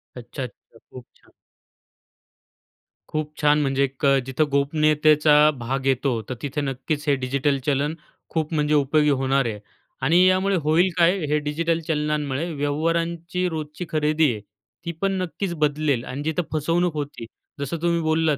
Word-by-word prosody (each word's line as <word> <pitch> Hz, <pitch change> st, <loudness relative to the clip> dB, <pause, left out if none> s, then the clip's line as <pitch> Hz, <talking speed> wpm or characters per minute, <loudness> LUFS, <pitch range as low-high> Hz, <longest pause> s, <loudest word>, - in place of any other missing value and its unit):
अच्छा, 125 Hz, +2 st, -7 dB
अच्छा, 120 Hz, -2 st, -12 dB
खूप 125 Hz, -1 st, -10 dB
छान. -, -, -26 dB, 1.8 s
खूप 155 Hz, 0 st, -3 dB
छान, 150 Hz, 0 st, +4 dB
म्हणजे 135 Hz, -1 st, +1 dB
एक 135 Hz, +1 st, -2 dB
अ, 140 Hz, 0 st, +5 dB
जिथं 135 Hz, +4 st, 0 dB
गोपनीयतेचा 150 Hz, +1 st, +3 dB, 0.3 s
भाग 130 Hz, +3 st, -3 dB
येतो, 130 Hz, -3 st, +1 dB
तर 130 Hz, -, -2 dB
तिथं 145 Hz, 0 st, -3 dB
नक्कीच 145 Hz, +3 st, -3 dB
हे 140 Hz, -, +4 dB
डिजिटल 140 Hz, +2 st, +1 dB
चलन 145 Hz, +1 st, +1 dB, 0.4 s
खूप 160 Hz, 0 st, -2 dB
म्हणजे 150 Hz, -1 st, +1 dB
उपयोगी 150 Hz, +1 st, +3 dB
होणार 135 Hz, -1 st, +1 dB
आहे. 105 Hz, -3 st, -3 dB, 0.4 s
आणि 165 Hz, +7 st, +4 dB
यामुळे 190 Hz, +1 st, +2 dB
होईल 165 Hz, +5 st, +3 dB
काय, 175 Hz, +3 st, +4 dB
हे 150 Hz, +1 st, +1 dB
डिजिटल 160 Hz, +3 st, -1 dB
चलनांमुळे 150 Hz, 0 st, -1 dB
व्यवहारांची 165 Hz, +4 st, -1 dB
रोजची 155 Hz, +2 st, -5 dB
खरेदी 155 Hz, -2 st, +2 dB
आहे, 105 Hz, -, -6 dB, 0.5 s
ती 170 Hz, -, -2 dB
पण 195 Hz, 0 st, +1 dB
नक्कीच 180 Hz, +1 st, -3 dB
बदलेल. 150 Hz, -4 st, 0 dB
आणि 135 Hz, +3 st, -5 dB
जिथं 160 Hz, +3 st, -1 dB
फसवणूक 165 Hz, +3 st, +1 dB
होती, 145 Hz, -5 st, -5 dB, 0.3 s
जसं 140 Hz, +4 st, -3 dB
तुम्ही 170 Hz, -1 st, +1 dB
बोललात 160 Hz, -2 st, +1 dB
150 Hz, 150 wpm, -23 LUFS, 140-160 Hz, 1.8 s, अ